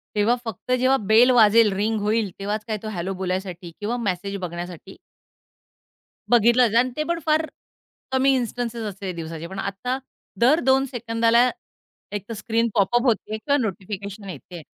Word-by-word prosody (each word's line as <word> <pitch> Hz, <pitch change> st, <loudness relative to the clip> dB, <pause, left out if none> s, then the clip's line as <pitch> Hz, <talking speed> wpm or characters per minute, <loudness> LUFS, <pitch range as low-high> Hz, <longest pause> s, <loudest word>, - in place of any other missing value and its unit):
तेव्हा 210 Hz, +4 st, +3 dB
फक्त 225 Hz, +3 st, -6 dB
जेव्हा 255 Hz, +2 st, +3 dB
बेल 220 Hz, +4 st, +5 dB
वाजेल, 225 Hz, -2 st, +6 dB
रिंग 215 Hz, +2 st, 0 dB
होईल, 210 Hz, -1 st, 0 dB
तेव्हाच 205 Hz, +2 st, -3 dB
काय 215 Hz, -, -2 dB
तो -, -, -5 dB
हॅलो 190 Hz, -1 st, -3 dB
बोलायसाठी 185 Hz, -2 st, -4 dB
किंवा 225 Hz, +4 st, -2 dB
मेसेज 200 Hz, -2 st, -2 dB
बघण्यासाठी 175 Hz, +1 st, -7 dB, 1.3 s
बघितलं 240 Hz, +1 st, +5 dB
जात 225 Hz, -, 0 dB
आणि 255 Hz, +1 st, +1 dB
ते 305 Hz, -, +1 dB
पण 340 Hz, 0 st, -1 dB
फार 315 Hz, 0 st, +2 dB, 0.7 s
कमी 265 Hz, +1 st, +3 dB
इन्स्टन्स 240 Hz, -1 st, -2 dB
असते 200 Hz, -4 st, -5 dB
दिवसाचे, 165 Hz, 0 st, -6 dB
पण 190 Hz, +1 st, -7 dB
आता 200 Hz, +7 st, -3 dB, 0.4 s
दर 265 Hz, +8 st, +5 dB
2 265 Hz, +1 st, +4 dB
सेकंदाला, 235 Hz, 0 st, +2 dB, 0.6 s
एकतर 205 Hz, +2 st, -5 dB
स्क्रीन 225 Hz, +2 st, 0 dB
पॉपअप 240 Hz, +5 st, +3 dB
होते 215 Hz, -2 st, 0 dB
किंवा 285 Hz, +6 st, +1 dB
नोटिफिकेशन 200 Hz, 0 st, -5 dB
येतेय. 175 Hz, -1 st, -9 dB
215 Hz, 150 wpm, -23 LUFS, 195-240 Hz, 1.3 s, वाजेल